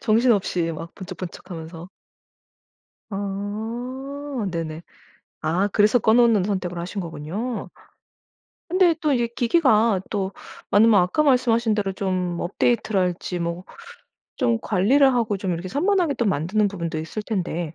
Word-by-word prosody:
정신없이 215 Hz, -7 st, +2 dB
막 165 Hz, +2 st, -8 dB
번쩍번쩍 185 Hz, 0 st, -8 dB
하면서. 165 Hz, 0 st, -8 dB, 1.2 s
아 230 Hz, +7 st, -4 dB
네네. 165 Hz, -1 st, -4 dB, 0.6 s
아 170 Hz, +6 st, +1 dB
그래서 210 Hz, +4 st, +4 dB
꺼 220 Hz, 0 st, +3 dB
놓는 230 Hz, -5 st, +4 dB
선택을 185 Hz, -3 st, -2 dB
하신 180 Hz, +4 st, -4 dB
거군요. 180 Hz, +9 st, -5 dB, 1.0 s
근데 355 Hz, -1 st, +4 dB
또 300 Hz, -2 st, +2 dB
이게 240 Hz, -2 st, +1 dB
기기가 230 Hz, -, +3 dB
또 195 Hz, -2 st, -2 dB, 0.4 s
많으면 210 Hz, -1 st, +6 dB
아까 180 Hz, +11 st, +1 dB
말씀하신 240 Hz, -5 st, +3 dB
대로 200 Hz, -2 st, -1 dB
좀 185 Hz, -2 st, -2 dB
업데이트랄지 185 Hz, -2 st, 0 dB
뭐 170 Hz, +2 st, -3 dB, 0.7 s
좀 235 Hz, -4 st, +2 dB
관리를 255 Hz, +9 st, +3 dB
하고 225 Hz, -4 st, 0 dB
좀 190 Hz, -2 st, -2 dB
이렇게 170 Hz, +2 st, -5 dB
산만하게 345 Hz, -, +1 dB
만드는 195 Hz, +4 st, +1 dB
부분도 170 Hz, -5 st, -4 dB
있을 165 Hz, +7 st, -5 dB
텐데 175 Hz, -6 st, -3 dB
205 Hz, 275 characters per minute, -23 LUFS, 180-235 Hz, 1.2 s, 많으면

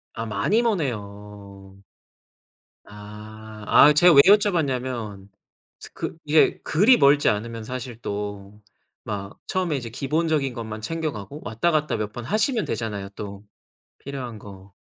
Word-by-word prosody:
아 115 Hz, -, -4 dB
많이 210 Hz, -, +1 dB
머네요. 100 Hz, -, -5 dB, 1.0 s
아. 105 Hz, +1 st, -11 dB
아 150 Hz, -, +7 dB
제가 175 Hz, +3 st, +6 dB
왜 140 Hz, -, +9 dB
여쭤봤냐면 130 Hz, -, +1 dB, 0.5 s
스 -, -, -10 dB
그 -, -, -5 dB
이게 150 Hz, +1 st, +3 dB
그리 215 Hz, +10 st, +4 dB
멀지 140 Hz, +1 st, +4 dB
않으면 115 Hz, +2 st, -3 dB
사실 125 Hz, -1 st, -7 dB
또 100 Hz, 0 st, -6 dB, 0.4 s
막 100 Hz, -2 st, -6 dB
처음에 180 Hz, -5 st, -1 dB
이제 120 Hz, -3 st, -5 dB
기본적인 145 Hz, +2 st, -1 dB
것만 110 Hz, -2 st, -6 dB
챙겨 160 Hz, +6 st, -3 dB
가고 105 Hz, +8 st, -9 dB
왔다 110 Hz, +11 st, 0 dB
갔다 155 Hz, -1 st, 0 dB
몇 105 Hz, -1 st, -4 dB
번 120 Hz, -, -7 dB
하시면 215 Hz, -, 0 dB
되잖아요 105 Hz, -4 st, -4 dB
또 100 Hz, -1 st, -7 dB, 0.6 s
필요한 130 Hz, -5 st, -7 dB
거. 100 Hz, -1 st, -13 dB
115 Hz, 260 characters per minute, -24 LUFS, 105-150 Hz, 1.0 s, 왜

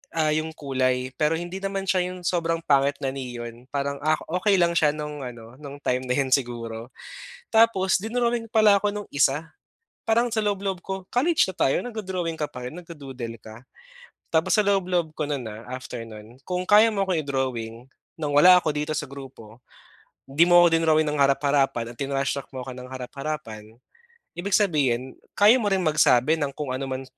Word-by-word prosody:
ah, 155 Hz, -2 st, +2 dB
'yong 155 Hz, +1 st, -2 dB
kulay 130 Hz, -2 st, -1 dB
pero 155 Hz, +1 st, +2 dB
hindi 175 Hz, +3 st, -5 dB
naman 195 Hz, 0 st, -3 dB
siya 190 Hz, -1 st, +1 dB
'yong 180 Hz, -1 st, -8 dB
sobrang 165 Hz, -1 st, -1 dB
pangit 140 Hz, -2 st, +3 dB
na 135 Hz, -, 0 dB
neon 120 Hz, -2 st, -7 dB
parang, 140 Hz, 0 st, -2 dB
ah, 155 Hz, +1 st, +2 dB, 0.2 s
okey 205 Hz, +1 st, +3 dB
lang 175 Hz, -2 st, +3 dB
siya 150 Hz, -2 st, +3 dB
no'ng 150 Hz, -1 st, -6 dB
ano, 120 Hz, +1 st, -10 dB
no'ng 145 Hz, -1 st, -10 dB
time 125 Hz, +1 st, 0 dB
na 125 Hz, -, 0 dB
'yon 135 Hz, -1 st, 0 dB
siguro. 120 Hz, -2 st, -2 dB, 0.5 s
Tapos 220 Hz, -4 st, +3 dB
dinrowing 235 Hz, +3 st, -1 dB
pala 215 Hz, -2 st, +6 dB
ako 205 Hz, +1 st, 0 dB
no'ng 205 Hz, 0 st, -6 dB
isa. 145 Hz, +3 st, 0 dB, 0.5 s
Parang 235 Hz, +2 st, +2 dB
sa 220 Hz, -2 st, -1 dB
loob-loob 195 Hz, -3 st, -2 dB
ko 190 Hz, -, -3 dB
college 300 Hz, -, +2 dB
na 190 Hz, -, -5 dB
tayo 135 Hz, -, +2 dB
nagdo-drawing 185 Hz, -8 st, -4 dB
ka 150 Hz, -, -1 dB
pa 125 Hz, -2 st, -8 dB
rin, 155 Hz, -, -10 dB
nagdu-doodle 135 Hz, -9 st, -8 dB
ka. 110 Hz, +3 st, -12 dB, 0.7 s
Tapos 160 Hz, +7 st, +2 dB
sa 210 Hz, -, +3 dB
loob 195 Hz, -2 st, +1 dB
loob 170 Hz, -3 st, 0 dB
ko 155 Hz, -, -2 dB
no'n, 140 Hz, -5 st, -3 dB
ah, 110 Hz, +1 st, -9 dB
after 125 Hz, -2 st, -7 dB
no'n, 115 Hz, +3 st, -13 dB
kung 180 Hz, 0 st, -3 dB
kaya 215 Hz, +2 st, +6 dB
mo 200 Hz, -2 st, 0 dB
akong 170 Hz, -4 st, +1 dB
i-drawing 125 Hz, -4 st, -3 dB, 0.3 s
no'ng 150 Hz, -2 st, -2 dB
wala 180 Hz, +4 st, +8 dB
ako 155 Hz, -4 st, 0 dB
dito 150 Hz, +1 st, -3 dB
sa -, -, -2 dB
grupo, 130 Hz, -4 st, -12 dB, 0.7 s
'di 160 Hz, +5 st, +4 dB
mo 175 Hz, 0 st, +7 dB
ako -, -, +6 dB
dinrowing 155 Hz, -1 st, +3 dB
ng 150 Hz, -, -2 dB
harap-harapan 140 Hz, -4 st, +1 dB
at 115 Hz, -, -19 dB
tinrashtrack 140 Hz, 0 st, -2 dB
mo 130 Hz, -, -5 dB
ako 130 Hz, 0 st, -7 dB
ng 125 Hz, -, -8 dB
harap-harapan. 130 Hz, -4 st, -6 dB, 0.7 s
Ibig 195 Hz, +2 st, 0 dB
sabihin, 135 Hz, -, 0 dB, 0.2 s
kaya 215 Hz, +5 st, +6 dB
mo 215 Hz, -, -1 dB
rin 195 Hz, -2 st, +1 dB
magsabi 150 Hz, -1 st, +3 dB
ng 140 Hz, -2 st, -2 dB
kung 145 Hz, -4 st, -4 dB
ano 135 Hz, +1 st, -3 dB
man 130 Hz, 0 st, -4 dB
150 Hz, 190 wpm, -24 LUFS, 130-185 Hz, 0.7 s, wala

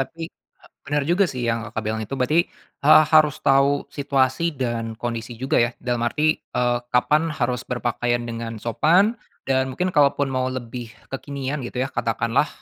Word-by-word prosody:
tapi, 165 Hz, +5 st, -4 dB, 0.6 s
benar 145 Hz, +1 st, 0 dB
juga 175 Hz, +6 st, +3 dB
sih 125 Hz, -4 st, -5 dB
yang 115 Hz, 0 st, -1 dB
Kakak 110 Hz, 0 st, -4 dB
bilang 110 Hz, +1 st, -2 dB
itu 110 Hz, -, -5 dB
berarti, 150 Hz, +7 st, +2 dB, 0.4 s
eee, 155 Hz, +1 st, +8 dB
harus 155 Hz, -2 st, +5 dB
tahu 140 Hz, +1 st, +3 dB
situasi 140 Hz, +3 st, 0 dB
dan 115 Hz, -3 st, -3 dB
kondisi 115 Hz, 0 st, -5 dB
juga 130 Hz, +3 st, -1 dB
ya 120 Hz, 0 st, +2 dB
dalam 120 Hz, -1 st, -2 dB
arti, 155 Hz, +5 st, +1 dB
eee, 120 Hz, 0 st, -1 dB
kapan 150 Hz, +6 st, +3 dB
harus 125 Hz, -5 st, -1 dB
berpakaian 120 Hz, 0 st, -1 dB
dengan 115 Hz, -1 st, -5 dB
sopan, 160 Hz, -, +3 dB, 0.3 s
dan 130 Hz, 0 st, +1 dB
mungkin 180 Hz, +8 st, -2 dB
kalaupun 145 Hz, -2 st, +3 dB
mau 130 Hz, 0 st, 0 dB
lebih 125 Hz, -2 st, -6 dB, 0.2 s
kekinian 140 Hz, +1 st, -4 dB
gitu 125 Hz, +1 st, -3 dB
ya -, -, -4 dB
katakanlah, 115 Hz, +4 st, 0 dB
130 Hz, 160 wpm, -23 LUFS, 120-145 Hz, 0.6 s, eee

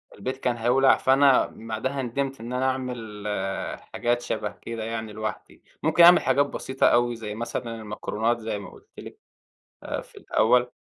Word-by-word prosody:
البيت 130 Hz, +1 st, -4 dB
كان 125 Hz, -2 st, -1 dB
هيولع 130 Hz, +3 st, +4 dB
فأنا 135 Hz, 0 st, +5 dB
بعدها 115 Hz, +5 st, -3 dB
نِدمْت 135 Hz, +2 st, -3 dB
إن 120 Hz, +2 st, -6 dB
أنا 130 Hz, +1 st, 0 dB
أعمل 120 Hz, -5 st, -5 dB
آآ، 95 Hz, -2 st, -3 dB
حاجات 120 Hz, 0 st, -2 dB
شَبَه 105 Hz, -3 st, -3 dB
كده 115 Hz, -1 st, -5 dB
يعني 110 Hz, -1 st, -4 dB
لوحدي، 110 Hz, -1 st, -6 dB, 0.2 s
ممكن 160 Hz, +3 st, +5 dB
أعمل 175 Hz, +1 st, +9 dB
حاجات 135 Hz, +2 st, +3 dB
بسيطة 135 Hz, -1 st, 0 dB
أوي، 120 Hz, 0 st, +3 dB
زي 105 Hz, -2 st, -6 dB
مثلًا 120 Hz, 0 st, -4 dB
المكرونات 110 Hz, +2 st, -2 dB
زي 110 Hz, -2 st, -4 dB
ما 100 Hz, -, -9 dB
قُلت -, -, -18 dB
لِك -, -, -10 dB, 0.7 s
آآ -, -, -3 dB
في -, -, -18 dB
الأول 125 Hz, +2 st, +2 dB
120 Hz, 165 wpm, -25 LUFS, 110-130 Hz, 0.7 s, أعمل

